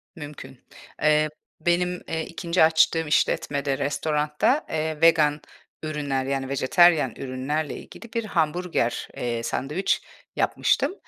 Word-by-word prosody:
Mümkün. 145 -5 -10 0.4
Eee, 155 0 +3 0.3
benim, 180 +1 0
eee, 160 0 -2
2'nci 170 0 0
açtığım 160 0 +3
işletmede, 145 -3 0
restoranda, 150 - 0
eee, 155 -1 -2
vegan 155 -3 +4 0.4
ürünler, 145 -4 -2
yani, 135 -1 -2
vejetaryen 155 +4 +4
ürünlerle 135 +4 -3
ilgili 230 - -12
bir 230 -1 -1
hamburger, 165 - -1
eee, 120 -1 -2
sandviç 150 +11 -1 0.3
yapmıştım. - - +1
155 Hz, 110 wpm, -24 LUFS, 140-165 Hz, 0.4 s, vegan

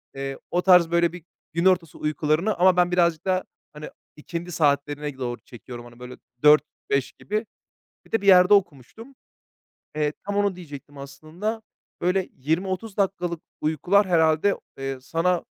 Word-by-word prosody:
eee, 135 0 -5
o 175 - +1
tarz 180 -3 +5
böyle 170 0 +2
bir 175 -3 -11 0.3
gün 170 +2 -1
ortası 180 -4 +2
uykularını 155 +6 0
ama 180 +1 +4
ben 175 0 +3
birazcık 170 -2 +1
da, 185 -1 +1 0.3
hani, 150 0 -8 0.3
ikindi 170 +3 -6
saatlerine 145 -2 0
doğru 120 -2 -4
çekiyorum. 120 0 -11
Hani 120 0 -15
böyle 125 0 -9 0.3
16.00, 150 0 +7 0.3
17.00 140 -2 0
gibi. 215 +2 -4 0.6
Bir - - -23
de 225 - +2
bir 200 - -6
yerde 185 +1 +7
okumuştum. 195 - -2 0.8
Eee, 150 -1 0
tam 205 0 -3
onu 200 -2 +1
diyecektim 145 -4 -11
aslında. 155 +11 -6 0.4
Böyle 185 +1 0
20, 160 +8 -1
30 195 +2 -5
dakikalık 180 -4 -1 0.2
uykular 175 +7 +2
herhâlde, 160 +2 +3 0.2
eee, 135 0 -4
sana, 170 +5 0
170 Hz, 155 wpm, -24 LUFS, 145-185 Hz, 0.8 s, 16.00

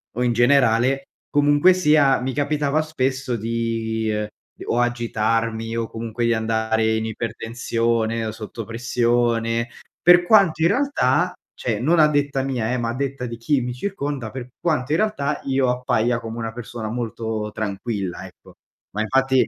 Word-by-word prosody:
o 125 - 0
in 120 - +2
generale, 125 +1 +3 0.3
comunque 145 +5 +4
sia 150 -6 +4
mi 130 +1 -2
capitava 145 +1 0
spesso 135 -4 -2
di: 115 0 -2 0.6
o 120 - 0
agitarmi, 115 -1 0
o 115 -1 -1
comunque 115 +1 -4
di 120 - +3
andare 110 0 +1
in 110 0 -1
ipertensione, 115 0 -1
o 110 - -2
sotto 110 +1 -7
pressione. 115 0 0 0.3
Per 175 0 +7
quanto 190 -6 +4
in - - +6
realtà 180 - +1 0.2
cioè 110 -4 -2
non 160 +8 +2
a 155 - +7
detta 145 -2 0
mia, 125 -4 -2
eh, 125 - 0
ma 115 -1 -2
a 120 - -3
detta 135 -1 -3
di 115 -1 -6
chi 135 +3 +1
mi 125 0 -3
circonda, 140 - -4
per 125 -1 -7
quanto 150 -6 -1
in 155 - +3
realtà, 150 -9 0
io 135 -1 +1
appaia 125 -1 +1
come 115 0 -7
una 115 -1 -3
persona 115 -2 -6
molto 110 -2 -3
tranquilla, 100 -3 -4
ecco. - - -16 0.4
Ma, 105 - -2
infatti 130 +3 +2
120 Hz, 155 wpm, -22 LUFS, 115-140 Hz, 0.6 s, Per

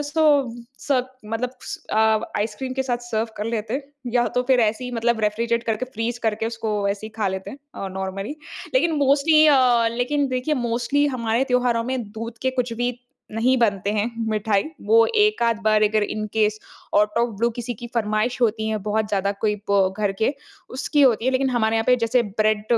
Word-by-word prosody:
उसको 295 +2 0 0.6
सब 260 -3 0 0.2
मतलब 245 +2 -2
स - - -6
अ, - - 0 0.4
आइसक्रीम 220 +5 -3
के 265 - 0
साथ 250 -2 -1
सर्व 225 -1 -1
कर 210 - -3
लेते 230 +4 -2 0.3
या 240 -1 +3
तो 250 - +3
फिर 255 -2 +5
ऐसे 220 +3 +1
ही 250 - -5
मतलब 235 0 0
रेफ़्रीजरेट 230 +2 0
करके, 225 +1 -1
फ़्रीज़ 240 -1 -4
करके 220 0 0
उसको 225 -1 -4 0.2
ऐसे 200 +2 -3
ही - - -10
खा 205 -3 0
लेते 190 0 -5
हैं, 275 - -10 0.2
अ, 195 - -5
नॉर्मली। 195 +8 -4 0.4
लेकिन 340 -9 +3
मोस्टली 295 +3 +4
अ, 250 -5 +4
लेकिन 280 +4 +1
देखिए 255 +4 -1
मोस्टली 245 +5 +1
हमारे 230 +2 +1
त्योहारों 245 -2 +2
में 260 -2 -1
दूध 230 +1 -7
के 260 - +2
कुछ 240 -1 -3
भी 245 - +2 0.4
नहीं 245 +4 +2
बनते 200 -4 +1
हैं 215 +3 0 0.2
मिठाई। 210 -2 +1 0.2
वो 225 +1 +6
एक-आध 420 - +3
बार 215 0 +4
अगर 215 0 +3
in 215 +1 -3
case 215 -1 +1 0.4
out 210 +2 +3
of 235 0 +1
blue 235 +1 +3
किसी 240 0 -3
की 240 +3 -8
फ़रमाइश 220 +2 0
होती 220 -2 +1
है 215 -1 -1
बहुत 215 0 0
ज़्यादा 200 -1 0
कोई 210 -1 +2 0.2
ब, 190 -1 +3
घर 205 -2 +1
के 275 - +2 0.4
उसकी 280 +3 +1
होती 235 -4 +4
है। 260 - +3
लेकिन 265 0 +1
हमारे 225 -2 +1
यहाँ 225 - +1
पे 250 - +5
जैसे 240 +1 +3 0.2
ब्रेड 215 -1 +2
230 Hz, 200 wpm, -23 LUFS, 215-255 Hz, 0.6 s, वो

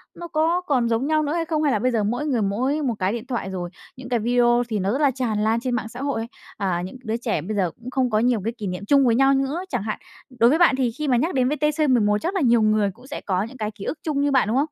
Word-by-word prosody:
nó 345 - -7
có 330 +3 +1
còn 255 -8 0
giống 230 +5 0
nhau 310 -1 +2
nữa 295 +2 -1
hay 335 -1 -1
không? 310 -2 -1
Hay 285 - +3
là 215 - +1
bây 255 +3 +1
giờ 220 -3 +1
mỗi 245 +8 -1
người 255 -7 0
mỗi 255 +10 0
một 250 -5 0
cái 185 +2 +1
điện 235 0 -5
thoại 235 -7 -3
rồi, 180 -2 -4 0.3
những 255 -1 -10
cái 240 -2 +1
video 240 +1 +3
thì 215 -2 -1
nó 195 +2 0
rất 275 +5 -1
là 280 -2 +4
tràn 235 -5 -2
lan 225 +1 +2
trên 250 0 -2
mạng 225 -2 -3
xã 245 +3 -8
hội 275 -5 -1
ấy, 230 - -5 0.3
à, 185 -4 -1
những 190 - -9
cái - - -25
đứa 220 +1 -1
trẻ 225 -10 -2
bây 210 +6 -4
giờ 180 -4 +1
cũng 240 +2 -8
không 255 -1 0
có 215 -1 +2
nhiều 235 -3 +2
cái 230 - -1
kỷ 205 - -4
niệm 180 +2 -5
chung 275 +2 +4
với 230 -1 +3
nhau 270 +1 +4
nữa, 275 +7 -1
chẳng 200 - -2
hạn. 215 - -4 0.4
Đối 235 +1 +6
với 315 +5 +2
bạn 345 -6 +5
thì 255 -3 0
khi 300 +5 -4
mà 250 -2 +3
nhắc 325 +8 0
đến 255 -1 +2
VTC11 285 -8 +2
chắc 365 +4 -2
là 370 - +1
nhiều 235 -3 +4
người 215 -2 +2
cũng 250 +4 -17
sẽ 290 - -6
có 190 0 -1
những 255 +4 -9
cái 215 -1 -3
ký 200 -1 -10
ức 315 - -4
chung 290 -3 -1
như 285 0 +1
bạn, 260 -5 +3
đúng 235 +4 +1
không? 285 - +3
245 Hz, 320 wpm, -23 LUFS, 215-280 Hz, 0.4 s, Đối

